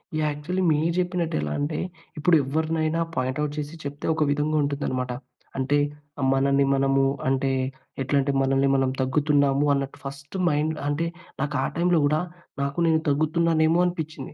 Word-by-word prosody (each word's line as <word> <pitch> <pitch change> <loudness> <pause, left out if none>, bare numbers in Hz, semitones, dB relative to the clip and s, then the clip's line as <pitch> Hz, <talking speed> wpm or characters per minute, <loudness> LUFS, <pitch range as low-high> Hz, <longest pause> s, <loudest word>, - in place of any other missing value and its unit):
Yeah! 155 -1 +1
Actually 170 +6 -3
మీరు 160 +3 +1
చెప్పినట్టు 180 -2 -1
ఎలా 75 -1 -2
అంటే, 145 +2 -1 0.4
ఇప్పుడు 165 +3 +4
ఎవరినైనా 155 +3 0 0.2
పాయింట్ 130 +3 -1
ఔట్ 150 0 -3
చేసి 150 +2 -4
చెప్తే 145 +1 -6
ఒక 155 - +2
విధంగా 150 +2 +1
ఉంటుందనమాట. 135 -3 -2 0.5
అంటే 135 +2 +1 0.6
మనల్ని 140 +1 +3
మనము, 135 0 +2 0.2
అంటే 135 0 +1 0.5
ఎట్లంటే, 140 +1 +1
మనల్ని 135 +1 +2
మనం 135 -1 +2
తగ్గుతున్నాము 140 +1 +2
అన్నట్టు 140 -1 -3
ఫస్ట్ 140 +6 -7
మైండ్ 155 +1 0
అంటే 150 +3 0 0.3
నాకు, 140 +1 -2
ఆ - - +1
టైమ్‌లో 175 0 +3
కూడా 150 +2 +2 0.4
నాకు 140 0 -3
నేను 160 -1 +3
తగ్గుతున్నానేమో 160 +2 +2
అనిపించింది. 160 -5 -4
145 Hz, 145 wpm, -25 LUFS, 135-160 Hz, 0.6 s, ఇప్పుడు